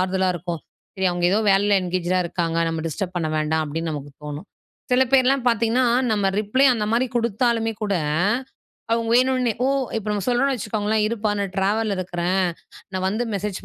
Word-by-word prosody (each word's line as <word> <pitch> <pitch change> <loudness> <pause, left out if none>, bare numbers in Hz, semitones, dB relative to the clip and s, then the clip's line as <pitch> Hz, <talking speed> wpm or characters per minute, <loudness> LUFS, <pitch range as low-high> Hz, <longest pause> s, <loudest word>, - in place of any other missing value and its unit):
ஆறுதலா 190 0 +1
இருக்கும். 170 -2 -5 0.4
சரி, 190 0 +1
அவுங்க 175 0 +1
ஏதோ 210 - +3
வேலையில 200 +1 +3
என்கேஜ்டா 180 0 0
இருக்காங்க. 165 -1 -2
நம்ம 165 -1 -3
டிஸ்டர்ப் 180 +3 -4
பண்ண 155 -2 -2
வேண்டாம். 155 +1 0
அப்படின்னு 165 +2 -3
நமக்கு 145 -1 -6
தோணும். 150 +6 -6 0.5
சில 255 +1 +5
பேர்லாம் 260 -1 +3
பாத்தீங்கன்னா, 230 +2 +2 0.3
நம்ம 200 -2 +1
ரிப்ளே 260 +6 +2
அந்த 210 -2 -1
மாரி 245 +3 +2
குடுத்தாலுமே 230 0 +1
கூட, 200 -2 0 1.0
அவங்க 230 0 0
வேணுன்னே, 255 -2 +2
ஓ, - - +3 0.3
இப்ப 215 -1 -4
நம்ம 200 -2 -2
சொல்றோம்னு 265 +3 +2
வச்சுக்கோங்களேன், 215 0 -1
இருப்பா 220 -2 -1
நான் 195 -1 -3
ட்ராவல்ல 205 +1 +1
இருக்றேன். 180 +1 0 0.5
நான் 185 0 -1
வந்து 215 +5 -1
மெசேஜ் 200 0 -4
200 Hz, 165 wpm, -22 LUFS, 180-230 Hz, 1.0 s, சில